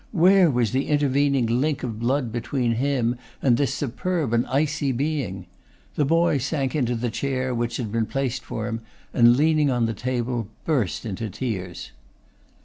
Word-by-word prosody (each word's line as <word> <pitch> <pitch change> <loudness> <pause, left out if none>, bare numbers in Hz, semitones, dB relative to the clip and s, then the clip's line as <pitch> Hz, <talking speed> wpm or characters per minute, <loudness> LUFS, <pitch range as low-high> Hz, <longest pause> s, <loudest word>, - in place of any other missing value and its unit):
Where 185 +1 +5
was 120 -6 +1
the 135 +2 0
intervening 140 -3 +2
link 130 +6 0
of 115 -4 -4
blood 125 0 0
between 120 +1 -1
him 125 -1 0 0.2
and 125 -3 +3
this 140 +2 +1
superb 145 0 -2
and 120 +1 +2
icy 145 +1 0
being? 130 - -2 0.5
The 150 - +1
boy 165 -1 +3
sank 135 +1 -1
into 125 -5 +1
the 120 0 -2
chair 130 0 -1
which 120 0 -2
had 115 -5 -4
been 115 -1 0
placed 130 -2 -2
for 110 - -4
him, 115 0 -3 0.3
and 120 0 +6
leaning 155 0 +3
on 120 -3 +1
the 115 - -1
table 120 -1 -2 0.2
burst 130 - 0
into 110 +1 -4
tears. 100 -5 -5
130 Hz, 165 wpm, -24 LUFS, 115-145 Hz, 0.5 s, and